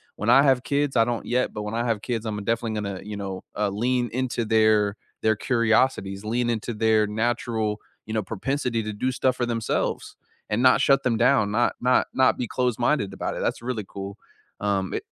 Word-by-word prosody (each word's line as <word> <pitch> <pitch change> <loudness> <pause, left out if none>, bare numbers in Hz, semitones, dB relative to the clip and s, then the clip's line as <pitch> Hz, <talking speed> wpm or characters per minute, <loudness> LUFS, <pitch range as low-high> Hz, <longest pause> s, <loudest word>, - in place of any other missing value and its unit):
When 105 +3 -2
I 135 +3 +7
have 135 -3 +4
kids- 145 -1 0
I 115 - +5
don't 120 -1 -3
yet- 125 +1 0
but 105 - -4
when 105 +1 -5
I 115 - 0
have 115 -3 0
kids, 115 -3 -3
I'm 105 -1 -3
definitely 115 +1 -1
gonna, 100 -3 -4
you 105 0 -6
know, 95 -2 -5
uh, 105 -1 +1
lean 120 +4 0
into 125 -2 -1
their 110 -2 +3 0.3
their 110 0 +3
curiosities, 115 -4 +1
lean 120 +2 0
into 115 +1 -3
their 110 -1 +3
natural, 110 -1 -1 0.3
you 110 - -6
know, 110 - +1
propensity 115 +3 -2
to 110 0 -4
do 125 +5 -1
stuff 130 0 0
for 120 - 0
themselves 115 -2 -2 0.3
and 105 +3 0
not 130 0 +5
shut 135 -1 +4
them 120 -3 +1
down, 115 -3 +3
not 120 +3 +2
not 125 +1 +3
not 130 -1 +3
be 125 - -2
close-minded 125 -3 0
about - - -3
it, - - -4
that's - - -1
really 120 -4 -3
cool. 100 +1 -7 0.4
Um, 100 -2 -1
i - - 0
115 Hz, 205 wpm, -25 LUFS, 105-125 Hz, 0.4 s, I